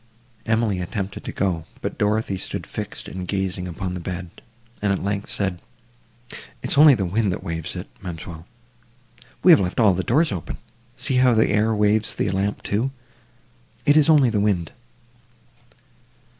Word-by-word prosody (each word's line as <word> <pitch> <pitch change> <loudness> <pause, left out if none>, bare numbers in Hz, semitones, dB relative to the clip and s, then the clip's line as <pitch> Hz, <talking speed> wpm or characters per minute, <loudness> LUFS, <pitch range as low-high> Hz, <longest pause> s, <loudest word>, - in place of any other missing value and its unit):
Emily 110 -4 +1
attempted 95 +2 -4
to - - -4
go, 90 -5 -1
but - - -5
Dorothée 105 -2 0
stood - - -4
fixed - - -6
and 90 -1 -6
gazing 95 -2 -2
upon 90 +1 -4
the 90 - -4
bed; 90 0 -5 0.5
and, 100 -1 +1
at 95 - -1
length, 100 +1 -2
said—"It 85 -10 -7 0.3
is - - +5
only 145 -1 +8
the 100 -4 -1
wind, 100 +3 +1
that 90 - -4
waves 80 -1 -4
it, - - -6
ma'amselle; 85 -2 -8 1.0
we - - +8
have - - +8
left 90 +2 -1
all 110 -5 +6
the 90 - -1
doors 150 - +2
open: 90 -6 -5 0.4
see 130 +1 +1
how 125 -2 +5
the 110 - +3
air 110 +2 +2
waves 105 +1 +2
the 95 - 0
lamp, 100 +2 -1
too.—It 120 +2 -4
is 155 0 +5
only 140 -6 +5
the 105 - +1
wind." 100 -5 0
100 Hz, 160 wpm, -23 LUFS, 90-115 Hz, 1.0 s, only